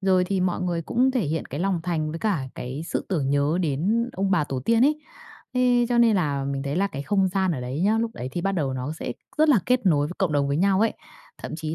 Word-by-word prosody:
Rồi 185 Hz, -1 st, +3 dB
thì 190 Hz, 0 st, -1 dB
mọi 180 Hz, 0 st, 0 dB
người 175 Hz, -2 st, -1 dB
cũng 250 Hz, +10 st, +2 dB
thể 255 Hz, -1 st, 0 dB
hiện 160 Hz, -4 st, -2 dB
cái 145 Hz, -, -6 dB
lòng 185 Hz, -2 st, 0 dB
thành 160 Hz, -3 st, -1 dB
với 165 Hz, -, -5 dB
cả 195 Hz, -9 st, 0 dB
cái 130 Hz, +5 st, -5 dB
sự -, -, -3 dB
tưởng 150 Hz, -8 st, 0 dB
nhớ 145 Hz, +4 st, +1 dB
đến 185 Hz, -, 0 dB
ông 195 Hz, +1 st, -1 dB
bà 175 Hz, -6 st, +3 dB
tổ 135 Hz, -3 st, -4 dB
tiên 230 Hz, 0 st, +3 dB
ấy. 300 Hz, +1 st, +2 dB, 0.5 s
Thế 245 Hz, -1 st, +3 dB
cho 240 Hz, -1 st, +1 dB
nên 230 Hz, -3 st, +5 dB
là 145 Hz, -6 st, 0 dB
mình 135 Hz, 0 st, -3 dB
thấy 140 Hz, +2 st, -3 dB
là 195 Hz, +2 st, +2 dB
cái 140 Hz, -8 st, -6 dB
không 195 Hz, +3 st, +1 dB
gian 190 Hz, 0 st, 0 dB
ở 140 Hz, -, -3 dB
đấy 125 Hz, +4 st, -4 dB
nhớ, 215 Hz, +3 st, +3 dB
lúc 230 Hz, 0 st, -1 dB
đấy 125 Hz, -, -5 dB
thì 175 Hz, -, -2 dB
bắt 195 Hz, +2 st, 0 dB
đầu 150 Hz, -8 st, -1 dB
nó 130 Hz, +4 st, -3 dB
sẽ 160 Hz, -, -5 dB, 0.3 s
rất 310 Hz, +1 st, +4 dB
là 275 Hz, -7 st, +6 dB
kết 250 Hz, -3 st, +2 dB
nối 145 Hz, -5 st, +3 dB
với 175 Hz, -, -7 dB
cộng 185 Hz, -5 st, +1 dB
đồng 140 Hz, -1 st, +1 dB
với 140 Hz, -, 0 dB
nhau 195 Hz, +2 st, +3 dB
ấy. 225 Hz, -, +2 dB, 0.5 s
Thậm -, -, -6 dB
chí 155 Hz, 0 st, -4 dB
180 Hz, 275 wpm, -24 LUFS, 145-205 Hz, 0.5 s, là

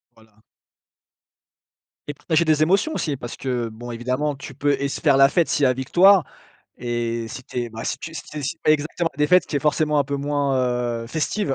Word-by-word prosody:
Voilà. 110 Hz, -1 st, -24 dB, 1.7 s
Et 145 Hz, -, -4 dB
partager 165 Hz, +2 st, +1 dB
des 155 Hz, -1 st, +3 dB
émotions 200 Hz, -, +2 dB
aussi 150 Hz, -4 st, -2 dB
parce 120 Hz, -2 st, -7 dB
que, 125 Hz, -3 st, -2 dB
bon 120 Hz, +2 st, -9 dB
évidemment, 130 Hz, +5 st, -2 dB
tu 135 Hz, -1 st, -10 dB
peux 145 Hz, +1 st, +1 dB
et 140 Hz, -, +1 dB
se -, -, -5 dB
faire 140 Hz, -3 st, +3 dB
la 135 Hz, 0 st, +6 dB
fête 170 Hz, -3 st, +2 dB
s'il 145 Hz, -, +1 dB
y -, -, +6 dB
a 130 Hz, -, +3 dB
victoire 175 Hz, +8 st, +5 dB, 0.5 s
et 120 Hz, -1 st, -3 dB
si 130 Hz, -, -8 dB
tu 125 Hz, -, -5 dB
es, 120 Hz, -, -3 dB
bah 115 Hz, +1 st, -7 dB
si -, -, -2 dB
tu 165 Hz, -, -8 dB
si -, -, -4 dB, 0.2 s
si 145 Hz, +5 st, -3 dB
tu -, -, -47 dB
fais 155 Hz, -, +7 dB
exactement, 155 Hz, +3 st, -1 dB
des 150 Hz, 0 st, +2 dB
fêtes 180 Hz, +2 st, +4 dB
qui 145 Hz, -, -3 dB
est -, -, +2 dB
forcément 150 Hz, +1 st, +1 dB
un 140 Hz, -, +2 dB
peu 140 Hz, +1 st, -3 dB
moins, 140 Hz, -1 st, 0 dB, 0.5 s
heu, -, -, -10 dB
festive. 155 Hz, -, -1 dB
140 Hz, 225 wpm, -22 LUFS, 125-155 Hz, 1.7 s, fais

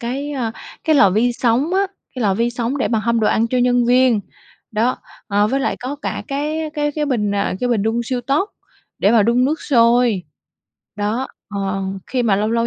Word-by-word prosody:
cái, 270 Hz, +5 st, -3 dB
ơ, 240 Hz, -5 st, -2 dB, 0.3 s
cái 315 Hz, -, +3 dB
lò 200 Hz, -7 st, +6 dB
vi 230 Hz, +5 st, +2 dB
sóng 255 Hz, +9 st, +1 dB
á, 395 Hz, +1 st, +2 dB, 0.3 s
cái 250 Hz, -, -3 dB
lò 195 Hz, -2 st, +2 dB
vi 235 Hz, +3 st, +1 dB
sóng 240 Hz, +3 st, -2 dB
để -, -, 0 dB
mà 225 Hz, -, +1 dB
hâm 235 Hz, +1 st, +1 dB
đồ 215 Hz, -, +2 dB
ăn 225 Hz, +1 st, +2 dB
cho 255 Hz, -, 0 dB
nhân 245 Hz, -1 st, +3 dB
viên, 250 Hz, -3 st, +4 dB, 0.5 s
đó. 230 Hz, +4 st, +1 dB, 0.3 s
Ờ, 205 Hz, +1 st, +2 dB
với 270 Hz, +5 st, 0 dB
lại 285 Hz, -, -1 dB
có 265 Hz, +4 st, -4 dB
cả -, -, -3 dB
cái 295 Hz, +3 st, -2 dB, 0.2 s
cái 295 Hz, 0 st, 0 dB
cái 300 Hz, 0 st, -1 dB
bình, 215 Hz, -7 st, 0 dB
ờ, 200 Hz, -2 st, 0 dB
cái 250 Hz, -, 0 dB
bình 225 Hz, -4 st, +1 dB
đun 225 Hz, +2 st, 0 dB
siêu 250 Hz, +1 st, -2 dB
tốc 280 Hz, -, 0 dB, 0.5 s
để 200 Hz, -, +3 dB
mà 225 Hz, -3 st, +5 dB
đun 235 Hz, +3 st, +3 dB
nước 305 Hz, +4 st, 0 dB
sôi. 235 Hz, -6 st, +3 dB, 0.7 s
Đó, 215 Hz, +6 st, -1 dB, 0.2 s
ờ, 195 Hz, -1 st, -2 dB, 0.2 s
khi 250 Hz, -1 st, -1 dB
mà 205 Hz, -4 st, +2 dB
lâu 215 Hz, +2 st, 0 dB
lâu 230 Hz, 0 st, +1 dB
240 Hz, 220 wpm, -19 LUFS, 220-265 Hz, 0.7 s, lò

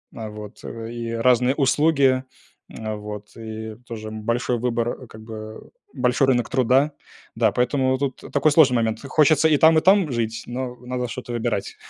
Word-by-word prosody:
А, 110 Hz, -2 st, -6 dB
вот. 105 Hz, -1 st, -10 dB
И 115 Hz, 0 st, -6 dB
разные 125 Hz, +3 st, +3 dB
услуги, 140 Hz, -2 st, +3 dB, 0.6 s
а, 110 Hz, -1 st, -4 dB
вот, 105 Hz, 0 st, -8 dB
и 110 Hz, -1 st, -7 dB
тоже, 110 Hz, -2 st, -6 dB
м, 110 Hz, 0 st, -7 dB
большой 120 Hz, +1 st, 0 dB
выбор, 120 Hz, -1 st, 0 dB
а, -, -, -12 dB
как 110 Hz, -1 st, -13 dB
бы, 110 Hz, -1 st, -9 dB, 0.2 s
большой 125 Hz, +2 st, +2 dB
рынок 120 Hz, -3 st, +2 dB
труда. 130 Hz, +3 st, +3 dB, 0.4 s
Да. -, -, +3 dB
Поэтому 130 Hz, +1 st, +1 dB
тут 135 Hz, -1 st, -3 dB
такой 145 Hz, +2 st, +3 dB
сложный 145 Hz, -5 st, +5 dB
момент. 110 Hz, -1 st, -1 dB
Хочется 155 Hz, +2 st, +3 dB
и 150 Hz, -, +4 dB
там, 160 Hz, +2 st, +6 dB
и 155 Hz, -, +4 dB
там 190 Hz, -4 st, +4 dB
жить, 115 Hz, -1 st, -2 dB
но 125 Hz, 0 st, -4 dB
надо 125 Hz, 0 st, -4 dB
что-то 125 Hz, 0 st, -6 dB
выбирать. 115 Hz, -4 st, -2 dB
125 Hz, 170 wpm, -23 LUFS, 110-135 Hz, 0.6 s, там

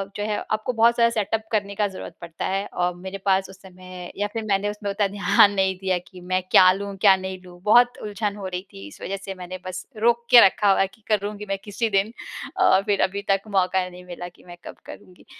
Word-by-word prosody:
जो 205 Hz, -, -3 dB
है 210 Hz, -, -1 dB
आपको 215 Hz, +3 st, -1 dB
बहुत 230 Hz, +1 st, +4 dB
सारा 235 Hz, 0 st, +5 dB
सेटअप 220 Hz, 0 st, -1 dB
करने 200 Hz, -2 st, -1 dB
का 210 Hz, 0 st, +1 dB
ज़रूरत 185 Hz, -3 st, -9 dB
पड़ता 170 Hz, -1 st, -6 dB
है 195 Hz, +1 st, -1 dB
और 180 Hz, 0 st, -1 dB
मेरे 190 Hz, +2 st, -7 dB
पास 190 Hz, -1 st, +2 dB
उस 190 Hz, 0 st, -15 dB
समय 185 Hz, -1 st, -11 dB
या 205 Hz, +1 st, 0 dB
फ़िर 225 Hz, -, -3 dB
मैंने 200 Hz, 0 st, 0 dB
उसमें 205 Hz, 0 st, -5 dB
उतना 200 Hz, 0 st, +1 dB
ध्यान 205 Hz, 0 st, +4 dB
नहीं 190 Hz, -1 st, +1 dB
दिया 185 Hz, -1 st, +1 dB
कि 180 Hz, -2 st, -13 dB
मैं 185 Hz, +1 st, -1 dB
क्या 185 Hz, 0 st, +8 dB
लूँ 200 Hz, 0 st, -6 dB
क्या 190 Hz, -, +7 dB
नहीं 190 Hz, 0 st, -6 dB
लूँ? 175 Hz, -1 st, -14 dB
बहुत 245 Hz, +4 st, +5 dB
उलझन 210 Hz, 0 st, -3 dB
हो 195 Hz, -2 st, -5 dB
रही 180 Hz, 0 st, -4 dB
थी 100 Hz, 0 st, -10 dB
इस -, -, -15 dB
वज़ह 195 Hz, -, -4 dB
से 195 Hz, -, -5 dB
मैंने 185 Hz, 0 st, -7 dB
बस 185 Hz, -, -6 dB
रोक 235 Hz, +2 st, +2 dB
के 245 Hz, -1 st, +10 dB
रखा 200 Hz, +1 st, +3 dB
हुआ -, -, +3 dB
है 195 Hz, -, +2 dB
कि 220 Hz, -, -30 dB
करूँगी 210 Hz, 0 st, -1 dB
मैं 195 Hz, -, -1 dB
किसी 220 Hz, +2 st, -2 dB
दिन 210 Hz, +4 st, 0 dB, 0.5 s
और 190 Hz, +1 st, +4 dB
फ़िर 200 Hz, -1 st, 0 dB
अभी 200 Hz, +1 st, -5 dB
तक 195 Hz, 0 st, +2 dB, 0.2 s
मौका 185 Hz, 0 st, +1 dB
नहीं 180 Hz, 0 st, -13 dB
मिला 175 Hz, 0 st, -7 dB
कि 175 Hz, -, -23 dB
मैं 175 Hz, 0 st, -11 dB
कब -, -, -9 dB
करुँगी। 180 Hz, -1 st, -13 dB
195 Hz, 240 wpm, -23 LUFS, 185-210 Hz, 0.5 s, के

